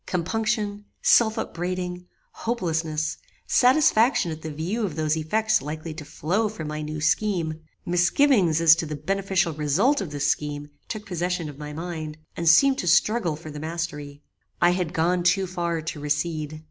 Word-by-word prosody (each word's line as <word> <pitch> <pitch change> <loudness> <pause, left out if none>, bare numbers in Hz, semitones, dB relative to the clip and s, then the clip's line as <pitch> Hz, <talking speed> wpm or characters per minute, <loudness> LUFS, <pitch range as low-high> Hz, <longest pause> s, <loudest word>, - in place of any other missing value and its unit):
Compunction, 205 +3 -1 0.2
self 220 -1 +5
upbraiding, 180 -2 -4 0.3
hopelesness, 160 -8 -2 0.3
satisfaction 250 - +4
at 160 0 -7
the 160 - -5
view 170 +10 -3
of 180 -8 -2
those 155 -1 0
effects 215 +8 +1
likely 155 +3 -6
to 155 0 -8
flow 185 +9 -1
from 165 -8 -6
my 155 0 -4
new 155 0 -5
scheme, 160 -2 0 0.2
misgivings 175 - +3
as 165 -1 +7
to 165 -1 -3
the 150 - -4
beneficial 190 +2 0
result 165 - +2
of 190 - -4
this 145 -1 -3
scheme 145 0 -2 0.2
took 215 -2 -6
possession 180 -3 -2
of 145 -1 -11
my 150 0 -6
mind, 155 -1 -6 0.2
and 170 -1 +2
seemed 270 +11 +5
to 180 - -3
struggle 175 0 +3
for 155 0 -10
the 150 - -7
mastery. 150 -3 -5 0.4
"I 175 - +5
had 180 -2 -1
gone 175 +2 +1
too 190 +2 +2
far 170 -3 -2
to 160 -1 -5
recede. 150 +1 -2
170 Hz, 165 wpm, -25 LUFS, 155-195 Hz, 0.4 s, as